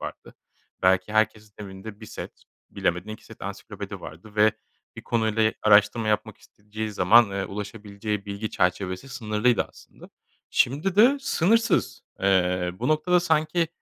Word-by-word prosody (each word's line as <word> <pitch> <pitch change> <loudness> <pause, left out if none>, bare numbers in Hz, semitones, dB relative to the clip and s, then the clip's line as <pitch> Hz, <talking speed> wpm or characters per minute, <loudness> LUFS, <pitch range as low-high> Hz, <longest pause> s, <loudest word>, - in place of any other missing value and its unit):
vardı. - - -8 0.5
Belki 95 +3 +2
herkesin 110 -1 0
evinde 100 +1 -9
1 110 - -9
set, - - -9 0.3
bilemedin 90 +4 -2
2 110 +1 -8
set - - -14
ansiklopedi - - -7
vardı 90 +7 -11
ve 105 0 +4 0.4
bir - - -8
konuyla 110 -1 +1
araştırma 105 +1 +4
yapmak 105 -2 -1
isteyeceği 105 +1 -7
zaman, 105 +3 +5
eee, 95 0 -2
ulaşabileceği 105 0 -5
bilgi 100 +2 -4
çerçevesi 95 +6 -1
sınırlıydı 115 -2 +1
aslında. - - -17 0.4
Şimdi 155 +9 +1
de 255 +7 +6
sınırsız. 230 -2 +1 0.2
Eee, 90 -2 +2
bu 125 - -1
noktada 165 +4 +3
sanki 160 0 +1
110 Hz, 135 wpm, -25 LUFS, 100-125 Hz, 0.5 s, de